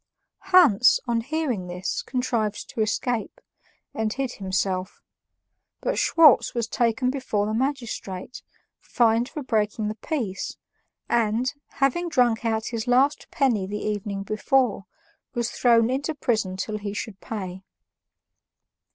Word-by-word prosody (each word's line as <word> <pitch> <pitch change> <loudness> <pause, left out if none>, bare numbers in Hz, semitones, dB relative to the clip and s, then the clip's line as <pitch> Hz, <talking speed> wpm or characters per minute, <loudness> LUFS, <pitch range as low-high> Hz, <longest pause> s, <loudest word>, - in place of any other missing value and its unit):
Hans, 320 - +6
on 235 -2 0
hearing 260 - -2
this, 180 +1 -3
contrived 235 -5 -2
to 225 - -3
escape, 225 +1 -1 0.5
and 220 -1 -1
hid 265 +1 -2
himself; 190 -2 -2 0.8
but - - -1
Schwartz 310 -7 +5
was 235 -2 -1
taken 240 +2 +1
before 255 -7 -1
the 215 - -2
magistrate, 235 -6 -3 0.4
fined 235 +1 +2
for 300 - -6
breaking 215 -2 0
the - - -2
peace, 220 - -4 0.5
and, 235 +3 +1 0.2
having 310 +6 +1
drunk 245 -7 +2
out 220 -1 0
his 230 0 -4
last 260 +4 +2
penny 230 -9 +1
the 205 +2 -4
evening 205 -2 -3
before, 215 0 +1 0.5
was 235 -1 -1
thrown 235 -1 +3
into 285 +4 -2
prison 215 -9 -1
till 215 +2 -3
he 205 0 -5
should 210 -2 -6
pay. 190 -4 -6
230 Hz, 125 wpm, -25 LUFS, 210-255 Hz, 0.8 s, Hans